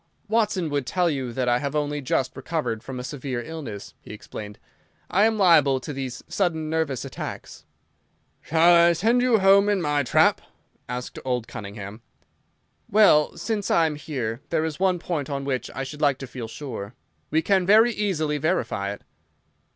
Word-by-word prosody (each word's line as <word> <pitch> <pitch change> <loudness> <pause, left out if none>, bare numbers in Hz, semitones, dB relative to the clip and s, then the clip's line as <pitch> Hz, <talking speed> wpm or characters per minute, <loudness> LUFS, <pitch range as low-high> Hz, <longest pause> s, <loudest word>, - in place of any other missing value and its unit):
"Watson 210 -7 0
would 140 -3 -1
tell 180 -2 +1
you 130 -4 -3
that 125 +1 -2
I 120 0 +3
have 140 +1 -3
only 145 0 -1
just 130 0 -1
recovered 135 -5 -3
from 130 0 -7
a - - -5
severe 130 -2 -4
illness," 135 -10 -7
he - - -12
explained. 105 -1 -9 0.5
"I 205 +4 +4
am 225 -1 -1
liable 155 -9 +5
to 140 +3 -7
these 130 -3 -5
sudden 160 -5 -1
nervous 160 -6 -1
attacks." - - -8 0.8
"Shall 165 +2 +4
I 170 0 +6
send 230 +8 +2
you 250 -2 +4
home 200 +1 +5
in 205 -2 +2
my 150 -3 +1
trap?" 130 - +3 0.5
asked 125 0 -5
old 125 -3 -2
Cunningham. 100 +1 -8 0.9
"Well, 195 -8 +4
since 205 +3 -2
I 165 - +4
am 155 - -1
here, 130 -6 -4
there 160 -1 0
is 160 0 -4
one 185 -1 +2
point 165 -5 -3
on 140 -1 -3
which 130 -2 -2
I 135 - -3
should 150 +3 -8
like 140 -3 +3
to 135 - -7
feel 125 -2 -7
sure. 115 -3 -7 0.3
We 160 +2 +1
can 190 0 +2
very 220 +4 +6
easily 160 -9 -1
verify 115 - -1
it." - - -13
150 Hz, 175 wpm, -24 LUFS, 130-175 Hz, 0.9 s, I